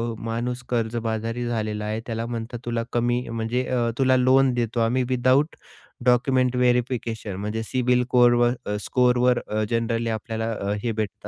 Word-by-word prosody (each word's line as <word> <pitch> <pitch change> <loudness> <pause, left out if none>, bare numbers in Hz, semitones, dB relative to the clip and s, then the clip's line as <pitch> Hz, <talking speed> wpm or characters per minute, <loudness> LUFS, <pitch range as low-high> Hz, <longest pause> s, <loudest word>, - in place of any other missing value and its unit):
अ, - - -12
माणूस 120 +2 -3
कर्जबाजारी 115 0 -2
झालेला 105 -2 -2
आहे, 110 +1 -2
त्याला 115 0 -3
म्हणतात 115 0 -5
तुला 115 -1 -1
कमी 120 +1 0
म्हणजे 115 +2 -1
अ, 120 -2 0
तुला 130 -1 +4
लोन 130 0 +4
देतो 120 -1 -1
आम्ही 120 +3 +2
विदाऊट 130 +4 +2 0.5
डॉक्युमेंट 125 0 +3
व्हेरिफिकेशन 120 -4 0
म्हणजे 105 +3 -3
सिबिल 125 +1 +1
कोरवर 120 -1 +4
अ, 105 - -2
...स्कोरवर 125 0 +2
अ, 110 0 -1
जनरली 115 0 0
आपल्याला 110 +1 -3
अ, 100 -1 -3
हे 115 - 0
भेटत 105 -1 -4
120 Hz, 155 wpm, -24 LUFS, 115-125 Hz, 0.5 s, तुला